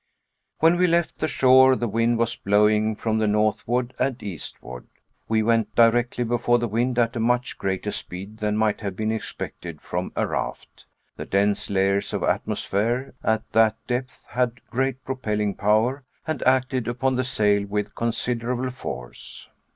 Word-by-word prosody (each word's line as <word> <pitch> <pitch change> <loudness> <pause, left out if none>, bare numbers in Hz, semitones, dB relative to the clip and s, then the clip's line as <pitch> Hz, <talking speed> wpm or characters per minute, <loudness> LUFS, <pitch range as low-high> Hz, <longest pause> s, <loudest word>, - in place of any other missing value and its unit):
When 165 +2 +4
we 180 0 +4
left 170 -1 +1
the 155 - 0
shore 130 -2 +6
the 120 - -2
wind 115 +2 +1
was 115 0 0
blowing 105 +2 +2
from 110 0 -1
the 110 - +2
northward 110 +4 0
and 130 0 +1
eastward. 70 -9 -8 0.4
We 110 0 +2
went 115 -1 +1
directly 120 +1 +3
before 120 +1 +2
the 120 0 -1
wind 120 +3 0
at 120 0 +2
a - - -2
much 120 +1 0
greater 95 -1 -2
speed 100 +4 -7
than 105 0 0
might 110 -1 +1
have 100 -3 -4
been 110 +2 -1
expected 110 - -6
from - - -4
a - - +1
raft. - - -5 0.3
The - - -5
dense 100 +1 +1
layers 100 0 +1
of - - -1
atmosphere 120 +7 -1
at 110 0 0
that 110 0 +4
depth 125 +2 -4
had 125 -1 -1
great 130 +1 -1
propelling 105 -6 -1
power 110 +8 +1 0.2
and 155 -5 -3
acted 130 -2 +2
upon 125 +2 0
the 130 - +1
sail 105 -5 +1
with 105 0 -2
considerable 120 +2 -2
force. 60 - -8
115 Hz, 160 wpm, -24 LUFS, 105-125 Hz, 0.4 s, shore